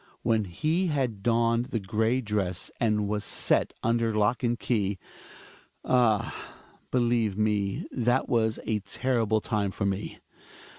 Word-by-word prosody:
When 110 Hz, -2 st, +2 dB
he 155 Hz, -, 0 dB
had 130 Hz, -, -1 dB
donned 115 Hz, +1 st, +2 dB
the 120 Hz, -4 st, -2 dB
gray 110 Hz, +6 st, 0 dB
dress, 100 Hz, -5 st, -2 dB
and 105 Hz, -3 st, +1 dB
was 105 Hz, 0 st, -2 dB
set -, -, +1 dB
under 115 Hz, -1 st, +1 dB
lock 105 Hz, +3 st, +2 dB
and 120 Hz, -1 st, 0 dB
key 105 Hz, -5 st, 0 dB, 0.5 s
— -, -, -24 dB
ah! 120 Hz, -5 st, +2 dB, 0.6 s
believe 120 Hz, -5 st, +1 dB
me 105 Hz, -2 st, 0 dB
that 120 Hz, +1 st, +1 dB
was 110 Hz, -1 st, +1 dB
a 110 Hz, -1 st, 0 dB
terrible 110 Hz, +1 st, 0 dB
time 105 Hz, -3 st, -1 dB
for 100 Hz, +1 st, -3 dB
me. 100 Hz, +1 st, -2 dB
110 Hz, 140 wpm, -27 LUFS, 105-120 Hz, 0.6 s, When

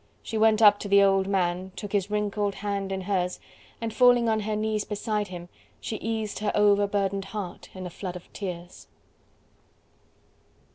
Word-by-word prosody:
She 225 Hz, -, -6 dB
went 220 Hz, 0 st, +4 dB
up 205 Hz, -1 st, +7 dB
to -, -, -5 dB
the 200 Hz, 0 st, +6 dB
old 195 Hz, -1 st, +3 dB
man 185 Hz, -1 st, -1 dB
took 205 Hz, -2 st, -6 dB
his 205 Hz, -1 st, 0 dB
wrinkled 210 Hz, -1 st, -1 dB
hand 200 Hz, -2 st, -3 dB
in 190 Hz, 0 st, -2 dB
hers 180 Hz, -2 st, -1 dB, 0.4 s
and 230 Hz, -1 st, -4 dB
falling 245 Hz, -2 st, +5 dB
on 220 Hz, -1 st, +2 dB
her 215 Hz, 0 st, -2 dB
knees 215 Hz, 0 st, -1 dB
beside 210 Hz, 0 st, -2 dB
him 175 Hz, -2 st, -8 dB, 0.3 s
she 220 Hz, -, -4 dB
eased 220 Hz, -1 st, -3 dB
her 210 Hz, 0 st, 0 dB
overburdened 200 Hz, -1 st, +2 dB
heart 195 Hz, -3 st, -7 dB
in 185 Hz, -1 st, -6 dB
a 180 Hz, -, -6 dB
flood 180 Hz, 0 st, -6 dB
of 180 Hz, -, -11 dB
tears. 180 Hz, -3 st, -7 dB
205 Hz, 170 wpm, -26 LUFS, 190-215 Hz, 0.4 s, up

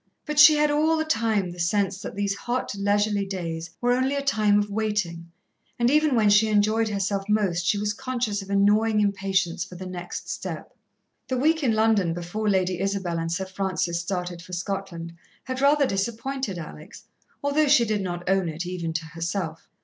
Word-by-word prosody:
But 300 Hz, -1 st, -1 dB
she 305 Hz, +1 st, +9 dB
had 300 Hz, 0 st, +3 dB
all 310 Hz, +2 st, +2 dB
the 315 Hz, -, 0 dB
time 225 Hz, -, 0 dB
the 175 Hz, -, -11 dB
sense 195 Hz, +2 st, 0 dB
that -, -, -7 dB
these 200 Hz, 0 st, 0 dB
hot, 240 Hz, +4 st, -3 dB
leisurely 205 Hz, +1 st, +1 dB
days 170 Hz, -4 st, -5 dB
were 245 Hz, 0 st, +1 dB
only 260 Hz, +2 st, +1 dB
a 280 Hz, -, -2 dB
time 215 Hz, -7 st, +3 dB
of 205 Hz, 0 st, +1 dB
waiting, 200 Hz, -6 st, -2 dB, 0.5 s
and 240 Hz, +1 st, +2 dB
even 300 Hz, -2 st, +3 dB
when 220 Hz, -2 st, +3 dB
she 210 Hz, +2 st, +5 dB
enjoyed 215 Hz, +1 st, +2 dB
herself 200 Hz, 0 st, -2 dB
most 185 Hz, -5 st, +1 dB
she 205 Hz, -, +3 dB
was 210 Hz, 0 st, -1 dB
conscious 235 Hz, -3 st, -2 dB
of 195 Hz, -, -11 dB
a 200 Hz, -, 0 dB
gnawing 210 Hz, +2 st, +3 dB
impatience 195 Hz, -3 st, 0 dB
for 180 Hz, -, -11 dB
the 185 Hz, +1 st, -7 dB
next 180 Hz, -1 st, -6 dB
step. -, -, -6 dB, 0.5 s
The 260 Hz, -, -1 dB
week 315 Hz, +5 st, +2 dB
in 250 Hz, -6 st, +2 dB
London 215 Hz, -6 st, +2 dB
before 175 Hz, +5 st, -2 dB
Lady 185 Hz, -2 st, +1 dB
Isabel 190 Hz, -3 st, -1 dB
and 165 Hz, 0 st, -3 dB
Sir 190 Hz, +3 st, -2 dB
Francis 185 Hz, -3 st, -2 dB
started 180 Hz, -1 st, -4 dB
for 180 Hz, +1 st, -12 dB
Scotland 175 Hz, -2 st, -4 dB, 0.3 s
had 260 Hz, 0 st, -4 dB
rather 285 Hz, +1 st, +4 dB
disappointed 230 Hz, +1 st, -2 dB
Alex, 155 Hz, -2 st, -10 dB, 0.4 s
although 290 Hz, +2 st, +2 dB
she 275 Hz, -4 st, +5 dB
did 215 Hz, -2 st, -1 dB
not 175 Hz, -2 st, -5 dB
own 190 Hz, -2 st, +2 dB
it, 160 Hz, +3 st, -5 dB
even 175 Hz, -2 st, -4 dB
to 165 Hz, 0 st, -3 dB
herself. 165 Hz, 0 st, -4 dB
200 Hz, 190 wpm, -25 LUFS, 180-225 Hz, 0.5 s, she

